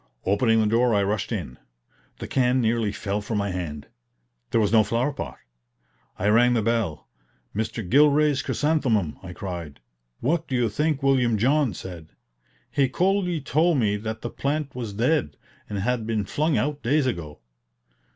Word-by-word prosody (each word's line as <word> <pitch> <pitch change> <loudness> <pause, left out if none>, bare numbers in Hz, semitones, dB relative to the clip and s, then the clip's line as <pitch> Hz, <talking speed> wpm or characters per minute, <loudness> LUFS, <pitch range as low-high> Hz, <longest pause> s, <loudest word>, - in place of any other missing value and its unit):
Opening 115 +3 +3
the 110 - +3
door 115 +2 +3
I 100 - +3
rushed 105 +4 -1
in. 85 - -4 0.6
The - - -6
can 130 -1 +2
nearly 115 -2 +1
fell 105 0 -3
from 105 +1 -3
my 100 -1 -1
hand. 80 -5 -5 0.6
There 115 - +2
was 105 -2 +2
no 110 -1 +6
flower 120 +6 0
pot! - - -6 0.8
I 100 - -1
rang 120 +3 +5
the 115 - +1
bell. 115 -8 -1 0.5
"Mr. 110 -1 -3
Gilray's 145 +3 +4
chrysanthemum!" 130 - 0
I 90 - -8
cried. 85 -6 -6 0.4
What 165 +5 0
do 130 - -2
you 120 -2 +2
think 150 +5 -1
William 125 -5 +3
John 130 - +2
said? 85 -4 -9 0.6
He 135 -2 +2
coolly 180 +1 +1
told 160 +3 +2
me 105 -5 +2
that 110 +1 -5
the 120 - -4
plant 145 0 -2
was 115 -5 -5
dead, 120 - 0 0.3
and 105 - -3
had 115 +2 -1
been 110 -3 -1
flung 155 +8 0
out 145 +1 -1
days 140 +4 +2
ago. 80 - -4
115 Hz, 165 wpm, -25 LUFS, 100-140 Hz, 0.8 s, no